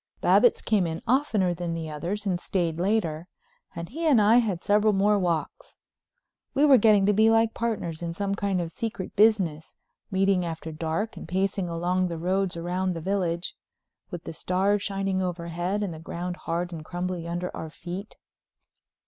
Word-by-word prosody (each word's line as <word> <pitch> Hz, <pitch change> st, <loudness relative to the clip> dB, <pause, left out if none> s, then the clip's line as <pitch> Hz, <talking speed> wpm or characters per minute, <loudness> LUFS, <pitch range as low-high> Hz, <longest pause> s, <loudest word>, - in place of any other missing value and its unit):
Babbitts 205 Hz, +7 st, +4 dB
came 180 Hz, -7 st, +1 dB
oftener 220 Hz, -8 st, +2 dB
than 170 Hz, -1 st, -3 dB
the 165 Hz, -1 st, -4 dB
others 175 Hz, +8 st, -4 dB
and 185 Hz, -3 st, 0 dB
stayed 170 Hz, -3 st, -1 dB
later, 175 Hz, -4 st, 0 dB, 0.5 s
and 170 Hz, 0 st, -6 dB
he 325 Hz, +7 st, -2 dB
and 275 Hz, -7 st, +6 dB
I 215 Hz, +3 st, +6 dB
had 205 Hz, -8 st, +1 dB
several 210 Hz, +1 st, +3 dB
more 205 Hz, +1 st, +3 dB
walks. 170 Hz, -4 st, -3 dB, 0.8 s
We 285 Hz, +2 st, +5 dB
were 275 Hz, -4 st, +7 dB
getting 210 Hz, -2 st, +5 dB
to 210 Hz, -, +4 dB
be 220 Hz, +2 st, +5 dB
like 225 Hz, 0 st, +3 dB
partners 205 Hz, -9 st, -3 dB
in 170 Hz, -1 st, -4 dB
some 200 Hz, +1 st, -1 dB
kind 200 Hz, -2 st, 0 dB
of 165 Hz, -1 st, -4 dB
secret 215 Hz, -3 st, -5 dB
business, 190 Hz, -8 st, +2 dB, 0.3 s
meeting 195 Hz, -2 st, +2 dB
after 165 Hz, -1 st, -5 dB
dark, 165 Hz, +8 st, -3 dB
and -, -, -8 dB
pacing 190 Hz, +1 st, -1 dB
along 180 Hz, +2 st, 0 dB
the 170 Hz, -1 st, -4 dB
roads 185 Hz, +1 st, 0 dB
round 180 Hz, +2 st, -1 dB
the -, -, -4 dB
village, 175 Hz, -1 st, -1 dB, 0.6 s
with 175 Hz, -4 st, -7 dB
the -, -, -7 dB
stars 195 Hz, +5 st, +1 dB
shining 195 Hz, -1 st, -1 dB
overhead 175 Hz, +2 st, -2 dB
and 190 Hz, -4 st, -3 dB
the 160 Hz, -, -9 dB
ground 175 Hz, +2 st, -5 dB
hard 175 Hz, +2 st, -2 dB
and 160 Hz, -2 st, -6 dB
crumbly 175 Hz, 0 st, -4 dB
under 175 Hz, +1 st, -3 dB
our 160 Hz, -, -6 dB
feet. 180 Hz, +5 st, -7 dB
185 Hz, 175 wpm, -26 LUFS, 170-205 Hz, 0.8 s, were